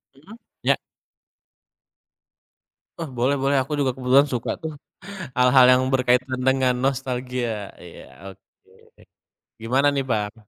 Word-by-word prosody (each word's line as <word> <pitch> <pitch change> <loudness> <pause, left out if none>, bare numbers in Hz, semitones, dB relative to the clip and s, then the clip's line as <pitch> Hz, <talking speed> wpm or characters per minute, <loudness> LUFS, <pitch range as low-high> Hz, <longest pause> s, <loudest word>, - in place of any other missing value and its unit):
Mhm, 160 +11 -15 0.3
iya. - - +3 2.2
Oh, 165 - -4
boleh 130 +4 +1
boleh. 140 +1 +1
Aku 140 - -13
juga 135 -2 +1
kebetulan 130 +2 +3
suka 125 -4 -3
tuh, 160 -1 -5 0.6
hal-hal 125 0 +6
yang 125 0 +4
berkaitan 130 0 +1
dengan 130 -1 +2
nostalgia. 125 -5 -3
Iya, 85 +2 -12
oke. 95 - -26 0.6
Gimana 130 +5 +2
nih, 135 - -1
Bang? 105 -1 -1
130 Hz, 115 wpm, -22 LUFS, 120-135 Hz, 2.2 s, hal-hal